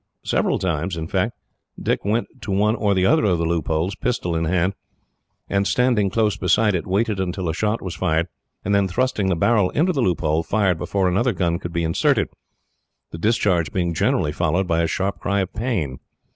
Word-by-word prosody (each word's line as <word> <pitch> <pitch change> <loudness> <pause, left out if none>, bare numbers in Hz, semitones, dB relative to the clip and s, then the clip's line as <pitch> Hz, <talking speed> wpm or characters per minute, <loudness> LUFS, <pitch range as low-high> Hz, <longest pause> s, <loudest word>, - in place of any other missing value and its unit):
Several - - +1
times, 85 -1 -2 0.8
Dick - - -1
went 110 +4 -2
to 100 - -5
one 105 +3 +2
or 105 -3 -1 0.2
other 160 +6 +4
of 95 -5 +2
the 85 - -1
loopholes, 80 +2 0
pistol 95 -9 -2
in 80 0 0
hand, 90 +3 +1 0.7
and, 100 0 +1
standing 120 -5 +2
close 105 -1 +1
beside 105 +2 +2
it, 85 -4 -2
waited 100 +2 0
until 95 -1 -2
a 80 - 0
shot 105 +6 -1
was 90 -3 -4
fired; 80 +2 0 0.4
and 100 - +1
then, 100 -1 +3
thrusting 105 0 0
the 90 - +2
barrel 105 +2 +3
into 180 +5 +1
the 140 - 0
loophole, 80 -6 +1
fired 95 -2 +1
before 95 0 0
another 115 +7 +1
gun 85 -2 0
could 85 -3 -6
be 85 0 -1
inserted, 80 0 +1 0.8
the 85 - -7
discharge 95 -6 +1
being 85 -3 -1
generally 75 -1 +1
followed 85 +4 0
by 85 0 +1
a 85 - +1
sharp 95 +4 -2
cry 100 0 0
of 95 - -4
pain. 95 - -2
95 Hz, 185 wpm, -22 LUFS, 85-105 Hz, 0.8 s, other